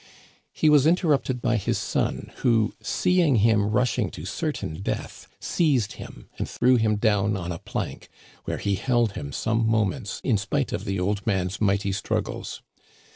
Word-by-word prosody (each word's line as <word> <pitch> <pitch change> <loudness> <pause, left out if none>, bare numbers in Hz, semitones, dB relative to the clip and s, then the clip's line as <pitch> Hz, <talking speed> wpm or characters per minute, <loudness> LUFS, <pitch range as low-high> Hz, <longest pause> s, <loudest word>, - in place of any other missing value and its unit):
He - - +1
was 150 -1 +6
interrupted 150 -7 +1
by 120 -1 +2
his 100 - -1
son, - - -2
who, 115 -3 +2
seeing 180 -6 +2
him 105 -1 +3
rush 125 +3 +1
ing 105 -5 +1
to 75 - -7
certain 100 - -3
death, - - -4
seized 135 - +1
him - - -11
and - - -2
threw 125 +1 +3
him 110 -2 +2
down 105 -1 +1
on 90 -1 -4
a 85 - -5
plank, - - -5 0.4
where - - -2
he 100 - -1
held 120 +1 +1
him 70 -7 -6
some 110 - 0
moments 110 +1 0
in 115 -6 +2
spite 130 +7 -1
of 100 - -3
the 100 -2 -2
old 100 +3 -1
man's 95 -2 -1
mighty 100 -1 +2
struggles. 95 +1 -3
110 Hz, 170 wpm, -25 LUFS, 100-125 Hz, 0.4 s, was